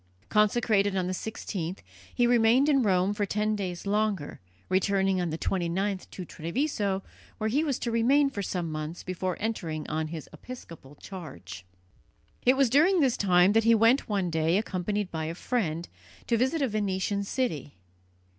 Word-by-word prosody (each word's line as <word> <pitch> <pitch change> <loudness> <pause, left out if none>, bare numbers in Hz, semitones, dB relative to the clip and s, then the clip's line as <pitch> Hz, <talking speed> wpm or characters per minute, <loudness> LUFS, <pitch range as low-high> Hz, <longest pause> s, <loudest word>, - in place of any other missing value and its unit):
Consecrated 210 -2 +2
on 185 -1 0
the 185 - -2
16th, 185 -3 -4 0.3
he 245 - +2
remained 240 +3 +4
in 280 -3 +4
Rome 190 -2 +2
for 205 -1 -1
ten 210 +2 0
days 185 -3 -4
longer, 205 -6 -1 0.3
returning 190 0 +2
on 175 - -1
the 160 - -3
29th 190 +3 -1
to 185 - -7
Treviso, 195 - -2 0.3
where 220 0 -1
he 290 +6 +2
was 280 -5 0
to 235 - -3
remain 265 +6 +4
for 205 - -4
some 175 -4 -3
months 155 +2 -5
before 185 0 -3
entering 170 -8 -3
on 155 0 -2
his 160 -1 -7
episcopal 160 - -11
charge. 95 - -9 0.8
It 255 +1 +6
was 275 -1 +5
during 320 +10 +4
this 265 -6 +3
time 180 -1 +4
that 225 +1 +4
he 230 +1 +5
went 230 +5 +3
one 195 -4 0
day, 160 +2 +2
accompanied 205 -1 -2
by 160 -1 -3
a 165 +1 -4
friend, 175 -7 -2 0.4
to 235 - +1
visit 265 +6 +1
a - - +2
Venetian 200 -2 -1
city. 195 - -2
200 Hz, 165 wpm, -28 LUFS, 175-230 Hz, 0.8 s, It